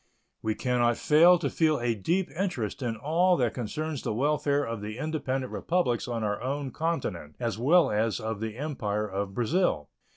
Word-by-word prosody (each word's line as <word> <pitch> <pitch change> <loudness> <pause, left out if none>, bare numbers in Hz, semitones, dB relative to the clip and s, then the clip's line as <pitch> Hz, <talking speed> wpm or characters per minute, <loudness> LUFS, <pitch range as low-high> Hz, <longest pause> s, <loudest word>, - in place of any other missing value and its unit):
We 110 -1 -1
can 125 +2 0
not 120 -1 +3
fail 170 +4 +6
to - - -2
feel 155 -2 +2
a 120 -1 +1
deep 170 - -1
interest 165 - -3
in 120 -3 -1
all 170 +8 +2
that 120 -3 +1
concerns 150 +5 -3
the 105 - -2
welfare 145 +2 +1
of 115 -5 -4
the 105 +2 -6
independent 135 -3 -2
Republics 165 -10 0
on 115 -2 -2
our 105 -1 -1
own 135 +1 -3
continent, 110 - -3
as 115 -3 -2
well 165 +8 +4
as 105 -2 0
of 110 -1 -4
the 110 0 -4
Empire 105 -8 -2
of 100 0 -4
Brazil. 120 - +1
125 Hz, 185 wpm, -28 LUFS, 110-155 Hz, -, fail